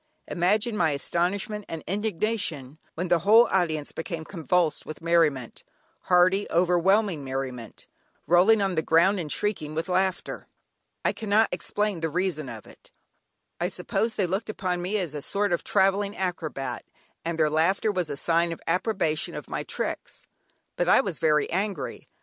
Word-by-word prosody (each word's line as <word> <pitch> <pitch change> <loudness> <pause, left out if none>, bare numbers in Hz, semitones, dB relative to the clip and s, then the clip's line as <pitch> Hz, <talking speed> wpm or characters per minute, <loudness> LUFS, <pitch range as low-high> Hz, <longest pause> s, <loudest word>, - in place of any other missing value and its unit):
Imagine 210 +6 +1
my 165 - +2
astonishment 190 +8 -1
and 165 -2 -5
indignation, 190 - -2 0.2
when 180 +2 -3
the 175 - +4
whole 220 +8 +6
audience 160 -6 0
became 165 -1 -5
convulsed 170 -1 0
with 155 - -8
merriment, 160 -7 +1 0.4
hearty, 185 +3 +4
overwhelming 180 0 +2
merriment, 130 -4 -5 0.4
rolling 195 +5 +5
on 195 -1 0
the 160 - +1
ground, 170 +5 +3
and 155 -4 -4
shrieking 155 -8 -2
with 160 +3 -2
laughter. 185 0 -1 0.6
I - - +2
cannot 220 0 +2
explain 205 +2 -2
the 160 0 -1
reason 165 -5 -2
of 110 -3 -9
it; - - -16 0.7
I - - +1
suppose 225 0 -1
they 195 - +1
looked 190 +6 -2
upon 180 -4 -2
me 190 +4 -1
as 175 -7 -3
a 150 - -5
sort 200 +4 -1
of 170 - -1
travelling 200 +2 +1
acrobat, 155 -8 -3 0.4
and 170 0 -3
their 155 -2 +2
laughter 185 +7 +2
was 180 -5 -2
a 145 - -4
sign 170 +2 +2
of 165 - -6
approbation 180 -3 0
of - - -7
my - - -2
tricks. - - -5 0.5
But - - +1
I - - +6
was 195 -9 -4
very 150 -1 +3
angry. 195 -3 -3
175 Hz, 160 wpm, -26 LUFS, 160-200 Hz, 0.7 s, whole